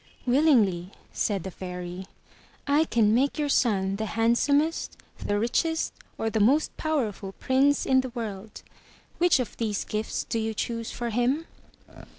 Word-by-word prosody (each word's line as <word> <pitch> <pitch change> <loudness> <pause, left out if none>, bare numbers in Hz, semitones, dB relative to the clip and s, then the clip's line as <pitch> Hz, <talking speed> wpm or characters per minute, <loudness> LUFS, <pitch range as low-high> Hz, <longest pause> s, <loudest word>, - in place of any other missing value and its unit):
*' - - -30
"Willingly,'' 240 - +3 0.2
said 200 -6 -1
the 190 - -6
Fairy. 180 0 -7 0.6
*'I 290 +3 +3
can 220 -7 +3
make 270 +4 +2
your 295 -1 0
son 195 -7 +2
the 220 +1 -3
Handsomest, 280 +9 +1 0.2
the 205 - -1
Richest 320 +9 0 0.2
or 225 - -1
the 220 - 0
most 270 +9 +3
Powerful 225 -11 -2
Prince 270 +5 +2
in 260 0 +4
the 260 - -5
world. 220 -4 -7 0.6
Which 350 -5 +4
of 250 - -3
these 215 -3 -2
gifts 215 +1 -3
do 230 - -2
you 220 0 -2
choose 230 +1 -3
for 240 -1 -4
him?" 250 +8 +1
230 Hz, 155 wpm, -26 LUFS, 205-280 Hz, 0.6 s, in